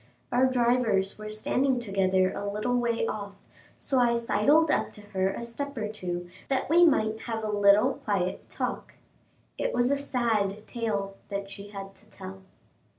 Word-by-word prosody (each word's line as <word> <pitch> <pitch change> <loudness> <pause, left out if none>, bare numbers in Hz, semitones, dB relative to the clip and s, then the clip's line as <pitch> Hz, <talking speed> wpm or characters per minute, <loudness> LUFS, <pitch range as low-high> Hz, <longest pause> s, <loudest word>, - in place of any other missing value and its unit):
Our 255 +2 +4
drivers 235 -6 +2
were 215 0 -6
standing 255 +5 +1
together 190 -4 +1
a 200 0 -3
little 215 +4 -1
way 235 -2 +1
off, 200 -3 -4 0.4
so 265 - +1
I 240 -1 +4
sidled 290 +7 +3
up - - +1
to 210 - -11
her 190 -1 +1
a 235 - -6
step 280 +4 -5
or 215 -1 -1
two, 175 -4 -4 0.2
that 265 -1 0
we 345 +2 +7
might 220 -9 +3
have 225 -1 -3
a 215 - -1
little 205 +5 +5
quiet 190 -3 -2
talk. - - -4 0.6
It - - -1
was 245 +2 +2
a - - +4
sad 225 -7 -1
tale 200 -4 -3
that 200 -1 -4
she 200 +1 -8
had 195 -1 -8
to 215 +2 -20
tell. 190 -1 -9
215 Hz, 170 wpm, -28 LUFS, 200-245 Hz, 0.6 s, we